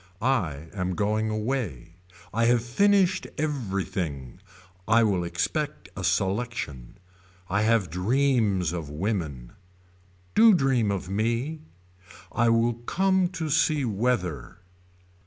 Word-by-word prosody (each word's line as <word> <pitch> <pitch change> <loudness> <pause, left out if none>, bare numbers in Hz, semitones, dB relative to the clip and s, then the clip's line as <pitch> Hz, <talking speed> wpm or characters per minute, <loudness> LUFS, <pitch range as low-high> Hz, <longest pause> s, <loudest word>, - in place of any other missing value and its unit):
I 85 - -1
am 90 -2 -2
going 110 +2 0
away. 110 - -3 0.4
I 115 +1 +2
have 120 0 +3
finished 190 +7 +2
everything. 95 - -3 0.5
I 115 +1 +5
will 95 -5 +1
expect 85 0 -3
a - - -5
selection. 95 - -2 0.5
I 100 +3 0
have 110 -6 +2
dreams 105 - +1
of 80 -4 -5
women. 75 - -3 0.8
Do 220 -1 +7
dream 130 -8 +2
of 100 -3 -2
me. 115 +10 -1 0.7
I 120 0 +2
will 115 +1 +3
come 185 +10 +1
to 170 -4 -4
see 150 -1 +2
weather. 100 - -1
110 Hz, 110 wpm, -26 LUFS, 90-130 Hz, 0.8 s, Do